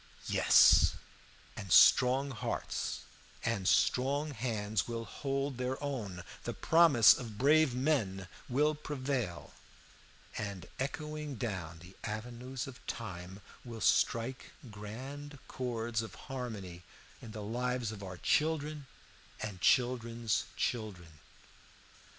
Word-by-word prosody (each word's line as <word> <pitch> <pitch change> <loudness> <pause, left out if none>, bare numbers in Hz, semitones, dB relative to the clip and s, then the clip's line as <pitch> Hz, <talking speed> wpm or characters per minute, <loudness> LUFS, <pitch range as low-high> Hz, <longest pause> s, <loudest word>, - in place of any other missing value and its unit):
"Yes, - - +6 0.6
and 95 -4 -7
strong 130 +8 +6
hearts 115 - -3 0.4
and 110 -5 0
strong 140 +8 +2
hands 110 -5 -2
will 115 -1 -4
hold 135 0 -3
their 130 +1 -1
own; 105 -11 -4 0.2
the - - -4
promise 160 -10 +6
of 115 -5 -7
brave 145 +1 +4
men 115 - 0 0.2
will 150 +5 +3
prevail, 135 - -3 0.8
and 100 -4 -5
echoing 150 +1 -4
down 95 -8 -4
the 90 +2 -14
avenues 120 +4 -5
of 135 -2 -11
time 95 -3 -6 0.2
will 115 -2 -8
strike 115 +5 +1 0.2
grand 135 +8 -8
chords 120 -2 -2
of 110 -4 -8
harmony 105 -9 -6 0.4
in 115 - -9
the 110 -1 -7
lives 125 +1 -2
of 105 -2 -8
our 90 -2 -7
children 150 - 0 0.5
and 100 -4 -6
children's 120 -2 +2
children. 90 -9 -3
120 Hz, 110 wpm, -33 LUFS, 105-135 Hz, 0.8 s, Yes